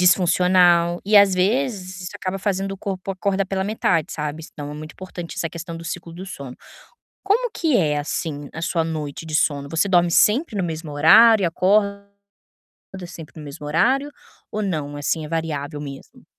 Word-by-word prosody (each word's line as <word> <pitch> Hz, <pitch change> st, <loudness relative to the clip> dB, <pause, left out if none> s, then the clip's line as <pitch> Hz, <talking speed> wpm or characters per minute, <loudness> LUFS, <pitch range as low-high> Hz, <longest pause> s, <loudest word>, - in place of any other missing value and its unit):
Disfuncional. 180 Hz, -1 st, +4 dB
E 210 Hz, +2 st, +4 dB
às 200 Hz, -2 st, +7 dB
vezes 195 Hz, -2 st, -1 dB
isso 180 Hz, -, -6 dB
acaba 190 Hz, +1 st, -4 dB
fazendo 195 Hz, 0 st, -1 dB
o -, -, -6 dB
corpo 195 Hz, -1 st, -5 dB
acorda 195 Hz, +1 st, 0 dB
pela 190 Hz, 0 st, -2 dB
metade, 180 Hz, -6 st, 0 dB
sabe. 150 Hz, +1 st, -4 dB
S -, -, -11 dB
então 145 Hz, -1 st, -7 dB
é -, -, -7 dB
muito 155 Hz, +1 st, -8 dB
importante 180 Hz, -2 st, -8 dB
essa 165 Hz, -, -1 dB
questão 170 Hz, 0 st, -7 dB
do 165 Hz, -, -9 dB
ciclo 170 Hz, 0 st, -6 dB
do 180 Hz, +3 st, -8 dB
sono. 140 Hz, -8 st, -8 dB, 0.7 s
Como 460 Hz, +5 st, +1 dB
que 320 Hz, -, +1 dB
é, 150 Hz, -6 st, +2 dB
assim, 145 Hz, 0 st, -4 dB
a 165 Hz, -, -7 dB
sua 170 Hz, 0 st, 0 dB
noite 155 Hz, -1 st, -5 dB
de 155 Hz, -, -6 dB
sono? 145 Hz, -2 st, +1 dB
Você 165 Hz, +5 st, +1 dB
dorme 175 Hz, -2 st, +4 dB
sempre 220 Hz, -, +3 dB
no 195 Hz, -, 0 dB
mesmo 160 Hz, -2 st, -5 dB
horário 215 Hz, +9 st, +7 dB
e -, -, +3 dB
acorda 200 Hz, +3 st, +1 dB, 1.0 s
sempre 165 Hz, -3 st, -11 dB
no 155 Hz, -, -8 dB
mesmo 145 Hz, 0 st, -8 dB
horário 260 Hz, -, +2 dB, 0.4 s
ou 215 Hz, -, -3 dB
não, 155 Hz, -7 st, -3 dB
assim, 155 Hz, +2 st, -1 dB
é -, -, -7 dB
variável 150 Hz, -2 st, -3 dB
mesmo? 140 Hz, -2 st, -10 dB
175 Hz, 185 wpm, -22 LUFS, 155-195 Hz, 1.0 s, às